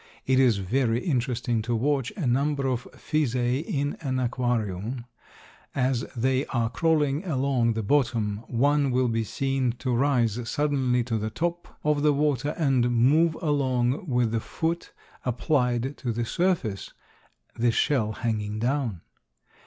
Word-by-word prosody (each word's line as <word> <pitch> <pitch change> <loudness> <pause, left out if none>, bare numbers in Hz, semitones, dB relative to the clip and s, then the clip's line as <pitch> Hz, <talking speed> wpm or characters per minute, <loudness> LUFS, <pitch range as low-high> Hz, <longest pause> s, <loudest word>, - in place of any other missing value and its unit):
It 130 0 +3
is 125 -5 +4
very 115 +4 +1
interesting 125 -5 0
to 120 +2 -1
watch 135 +1 0
a 170 - -2
number 140 +3 +1
of 125 -2 -2
Physae 130 -2 0
in 145 -3 -2
an 130 -4 -1
aquarium; 120 -2 -2 0.7
as 130 -1 +1
they 130 +3 +1
are 115 -2 -1
crawling 150 +1 +1
along 135 - +1
the 110 0 -2
bottom, 115 -4 +1
one 140 +3 +2
will 130 0 +2
be 115 -1 0
seen 135 +2 -1
to 125 0 -2
rise 120 -4 +1
suddenly 135 -4 +1
to 115 -2 -2
the 110 +1 -2
top 170 +9 -4
of 150 -1 +2
the 150 0 +4
water 145 -1 0
and 135 -7 +2
move 145 +8 +3
along 135 +1 +1
with 125 -4 +1
the 115 - 0
foot 165 +8 -3 0.3
applied 125 0 0
to 120 - -3
the 115 +1 -2
surface, 170 - -1 0.6
the 120 +1 +2
shell 115 -4 +1
hanging 110 -2 -2
down. 120 - -1
125 Hz, 145 wpm, -26 LUFS, 115-145 Hz, 0.7 s, is